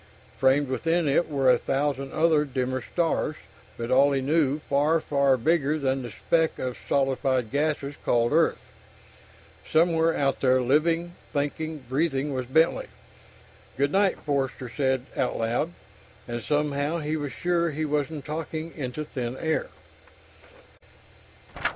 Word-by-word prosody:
Framed 135 +2 +3
within 165 +6 0
it 145 +5 +2
were 135 -3 +3
a 125 - +3
thousand 135 0 -1
other 155 -2 +3
dimmer 130 -2 -2
stars, 165 +2 -1 0.4
but 115 0 -4
all, 140 +2 +5
he 135 - +1
knew, 145 +1 +2
far, 150 +4 +2
far 140 -3 +2
bigger 155 +2 +1
than 135 -2 0
the 120 - -6
speck 160 +8 0
of 125 -1 -3
solidified 135 -3 +1
gases 145 0 -1
called 120 0 +2
Earth. 165 +1 +1 1.0
Somewhere 165 0 +3
out 135 -1 +1
there, 130 -1 +4
living, 165 +7 +1 0.2
thinking, 150 +1 -3
breathing 140 +1 0
was 130 -2 -3
Bentley. 160 +6 +2 0.9
"Good 140 +2 +1
night," 195 -1 +2
Forster 135 -4 -2
said 130 -2 0
out 125 - -1
loud. 120 +8 0 0.6
And 120 0 -4
somehow, 145 +2 0
he 155 -1 -2
was 145 -3 -3
sure 170 +3 0
he 155 +1 -2
wasn't 150 0 -2
talking 160 +1 -5
into 145 +1 -4
thin 125 -2 -4
air. 160 +1 -1
145 Hz, 135 wpm, -26 LUFS, 130-160 Hz, 1.0 s, all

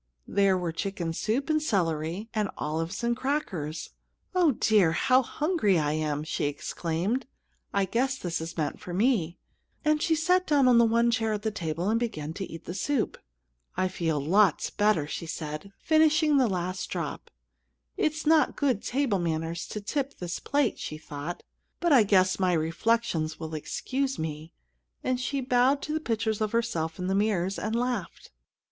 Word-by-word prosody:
There 195 -1 +3
were 175 -2 -2
chicken 170 -1 -3
soup, 230 +10 -1
and 310 -1 +2
celery, 175 - -1
and 210 -3 0
olives, 165 +7 -3
and 235 0 +2
crackers. 205 - -3 0.4
"Oh, 350 -6 +4
dear! 210 -8 +3
How 255 +9 +4
hungry 295 - +1
I 150 -2 +1
am!" 150 -1 -1
she 155 - -2
exclaimed. 170 - -2 0.4
"I 200 -1 +2
guess 255 +7 0
this 170 -8 -3
is 165 +1 -6
meant 150 -3 -2
for 175 - -6
me;" 195 -6 +1 0.5
and 305 0 +3
she 325 - +2
sat 360 +3 +2
down 285 -4 +4
on 245 -2 +6
the 235 - +6
one 235 +1 +3
chair 225 -2 +1
at 210 0 -3
the 220 - 0
table 170 -2 -3
and 225 +2 +2
began 160 -10 -3
to 190 +2 -6
eat 165 0 -9
the 175 - -5
soup. 235 +5 -1 0.6
"I 185 - +2
feel 165 -5 -1
lots 185 +5 +3
better!" 205 -8 +2
said 155 -1 -5
she, 200 - -14
finishing 310 -1 +4
the 260 -3 +4
last 185 -1 -2
drop. - - -4 0.7
"It's 310 +1 -1
not 310 -1 +4
good 260 -8 +1
table 250 -5 0
manners 165 0 -2
to 210 - -5
tip 280 +6 -3
this 175 -1 -4
plate," 285 -4 0
she 155 - -5
thought; 155 +3 -6 0.4
"but 345 -3 +3
I 260 - +8
guess 185 -2 +3
my 185 -1 +2
reflections 165 0 0
will 160 -1 -6
excuse 265 - -2
me," 155 0 -5 0.5
and 255 -1 0
she 275 +2 -2
bowed 255 +2 +3
to 305 - -3
the 315 - 0
pictures 220 -6 -1
of 215 0 -1
herself 170 -9 -1
in 180 - -4
the 190 - 0
mirrors, 195 -2 +1
and 220 +1 -2
laughed. 240 -6 -3
205 Hz, 175 wpm, -28 LUFS, 165-255 Hz, 0.7 s, I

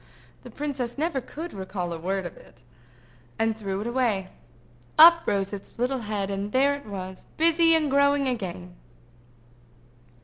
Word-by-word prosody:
—the - - -11
princess 275 -5 -4
never 300 -3 -1
could 320 +7 -8
recall 190 -2 -4
a 165 - -6
word 190 +2 -2
of 175 - -7
it—and 125 - -7
threw 200 -2 -4
it - - -5
away. 235 -6 0 0.7
Up 335 +1 +9
rose 200 -1 0
its 200 +3 -9
little 255 +2 0
head, 205 -3 -3
and 200 +1 -3
there 275 +3 +3
it 285 -4 -8
was, 190 -2 -7
busy 330 0 +5
growing 280 0 +3
again! 180 -7 -4
210 Hz, 140 wpm, -26 LUFS, 185-280 Hz, 0.7 s, Up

